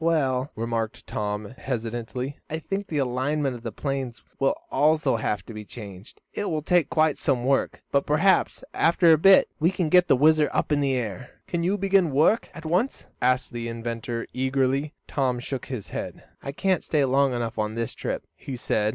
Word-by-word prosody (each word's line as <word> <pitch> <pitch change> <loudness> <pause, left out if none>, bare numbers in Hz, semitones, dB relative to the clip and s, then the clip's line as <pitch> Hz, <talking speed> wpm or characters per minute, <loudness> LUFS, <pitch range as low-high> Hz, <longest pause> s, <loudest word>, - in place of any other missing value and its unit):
"Well," 140 -5 +1
remarked 115 -1 -3
Tom, 105 +1 -3
hesitatingly, 125 +2 -4
"I 160 - -2
think 195 +5 -4
the 150 -3 0
arrangement 135 +2 0
of 120 - -9
the 115 - -5
planes 130 -3 -4 0.2
will 135 - +2 0.2
also 150 -4 +3
have 105 -2 -2
to 115 - -9
be 105 0 -7
changed. 100 -3 -11
It 205 - -2
will 155 -2 -2
take 175 -1 +2
quite 160 -2 +2
some 125 -3 0
work, 135 0 0
but 140 0 +1
perhaps, 165 - +2
after 170 0 +4
a - - +5
bit, 195 +3 +7
we 165 +2 +4
can 180 -4 -1
get 180 +2 +5
the - - +5
WHIZZER 155 +2 +4
up - - -1
in 145 -1 +3
the 135 -2 +1
air." 115 -2 -4 0.2
"Can 175 - -2
you 185 +4 +1
begin 195 -3 +3
work 150 +11 +3
at 165 - -9
once?" 180 +11 0 0.2
asked 125 +1 +1
the 120 -1 -4
inventor, 115 0 -4
eagerly. 135 +2 0
Tom 130 -3 0
shook 130 +2 -5
his 125 -7 -6
head. - - -6 0.2
"I 140 - -5
can't 180 +3 0
stay 150 -3 +2
long 135 0 +2
enough 115 -1 -3
on 110 0 -1
this 115 -1 -2
trip," - - -4
he 135 - -7
said. 105 -3 0
135 Hz, 195 wpm, -25 LUFS, 120-155 Hz, 0.2 s, bit